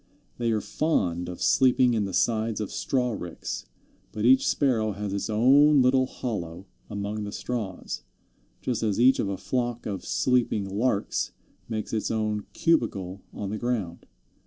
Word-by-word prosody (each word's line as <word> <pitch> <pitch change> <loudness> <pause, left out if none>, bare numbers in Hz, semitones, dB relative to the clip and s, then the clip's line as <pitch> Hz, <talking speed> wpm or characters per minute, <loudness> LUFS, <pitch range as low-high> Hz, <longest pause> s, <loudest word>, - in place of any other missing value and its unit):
They 120 -1 +1
are 110 -2 +1
fond 90 - 0
of 90 - -5
sleeping 125 -2 +4
in 110 -3 +1
the 95 - -4
sides 110 -2 +1
of 105 - -3
straw 125 -2 0
ricks, 90 - -5 0.4
but 105 +1 -2
each 130 +2 +5
Sparrow 115 -7 +1
has 100 0 -4
its 100 +2 -2
own 135 +6 +5
little 130 +1 +3
hollow 95 -9 -5 0.2
among 105 +1 -3
the 100 - -5
straws, 105 -5 -4 0.6
just 120 -3 -2
as 110 -2 0
each 130 +2 +5
of 100 - 0
a 100 - -2
flock 120 -2 -2
of 95 -4 -4
sleeping 120 -5 +1
Larks 105 +2 -1 0.4
makes 110 -1 -4
its 110 - -1
own 110 -2 -1
"cubicle" 100 - 0
on 100 -1 -5
the 110 - -3
ground. 110 -9 -3
110 Hz, 160 wpm, -26 LUFS, 100-125 Hz, 0.6 s, each